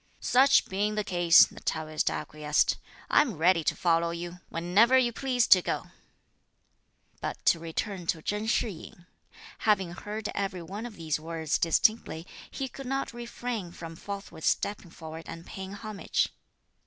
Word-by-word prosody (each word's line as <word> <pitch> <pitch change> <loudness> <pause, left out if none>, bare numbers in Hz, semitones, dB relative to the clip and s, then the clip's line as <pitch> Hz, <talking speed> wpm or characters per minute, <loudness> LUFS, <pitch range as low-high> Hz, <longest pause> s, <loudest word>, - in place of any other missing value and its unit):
"Such 270 +2 +5
being 205 +2 -1
the 210 - 0
case," 175 -3 +6
the - - -12
Taoist 155 -1 -1
acquiesced, 150 0 0 0.3
"I - - +7
am 245 - -2
ready 170 +1 +4
to - - +2
follow 170 -1 +2
you, 170 +1 -6
whenever 200 +10 +4
you 240 -2 +2
please 250 -1 +1
to 185 - +8
go." - - -3 1.3
But - - -5
to 170 - +5
return 170 +2 -4
to 160 - 0
Chen 210 +1 -2
Shih 230 0 +2
yin. 175 0 -12 0.5
Having 195 -5 +2
heard 210 +4 -5
every 190 -3 -3
one 205 +7 -6
of 225 - -11
these 160 -3 -2
words 160 -1 -2
distinctly, 170 -1 +2 0.2
he 270 - -4
could 270 +1 -9
not 270 -1 -2
refrain 235 -5 -5
from 165 -1 -9
forthwith 195 -3 -8
stepping 200 -3 0
forward 160 0 -9
and 165 0 -8
paying 190 0 -7
homage. 210 0 -1
190 Hz, 155 wpm, -28 LUFS, 165-220 Hz, 1.3 s, to